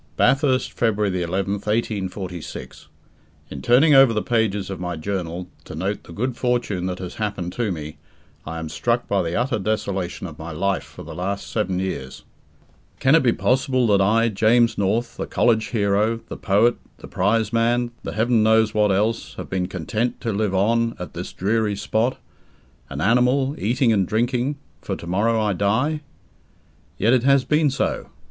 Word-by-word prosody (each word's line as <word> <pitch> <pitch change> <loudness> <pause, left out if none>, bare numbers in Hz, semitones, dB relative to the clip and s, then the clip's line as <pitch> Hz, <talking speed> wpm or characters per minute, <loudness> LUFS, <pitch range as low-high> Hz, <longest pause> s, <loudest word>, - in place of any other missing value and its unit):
Bathurst, 135 -2 +2
February 105 -3 +1
11th, 95 +4 -2
1846. 95 -5 -4 0.6
In 70 - -6
turning 135 - +5
over 135 -3 +7
the 105 - -1
pages 105 -5 0
of 95 - -5
my 90 -1 -3
journal, 90 0 -4 0.2
to - - -8
note 95 +5 -2
the - - -12
good 120 +8 -2
fortune 120 -8 -1
that 90 -1 -3
has 90 -1 -6
just - - -13
happened 100 -5 -3
to 115 -2 -1
me, 75 -3 -6 0.5
I 80 +1 -6
am 80 -1 -4
struck 120 +10 -1
by 100 -1 +1
the 85 +1 -2
utter 120 0 0
desolation 95 -3 -2
of 80 -4 -9
my 80 +1 -6
life 100 +5 0
for - - -12
the - - -9
last 100 +3 -4
seven 100 -4 -1
years. 90 -9 -4 0.8
Can 135 - +4
it 165 - +6
be 125 - +3
possible 130 +1 +1
that 100 - +3
I, 115 +4 +3
James 115 +3 +3
North, 110 +4 -1
the - - -4
college 110 -2 +2
hero, 105 +1 +1
the - - -6
poet, 110 +4 +3 0.2
the - - -11
prizeman, 115 +4 +1
the - - -5
Heaven 115 +1 +2
knows 110 0 +4
what 105 -1 +3
else, 110 +4 0
have - - -8
been 95 -1 -1
content 105 +8 -2
to 115 -3 -2
live 100 -1 0
on 115 +4 +2
at 90 - -7
this - - -6
dreary 105 +1 0
spot 110 +5 0 0.7
an 70 +1 -5
animal, 125 - +3
eating 120 +2 +2
and 95 -4 +1
drinking, 120 +5 0 0.3
for - - -3
tomorrow 105 +7 0
I 105 -2 +1
die? 125 - 0 1.0
Yet 115 +3 +3
it 130 - +4
has 140 +1 +3
been 150 0 +3
so. 135 - -2
110 Hz, 175 wpm, -22 LUFS, 95-120 Hz, 1.0 s, over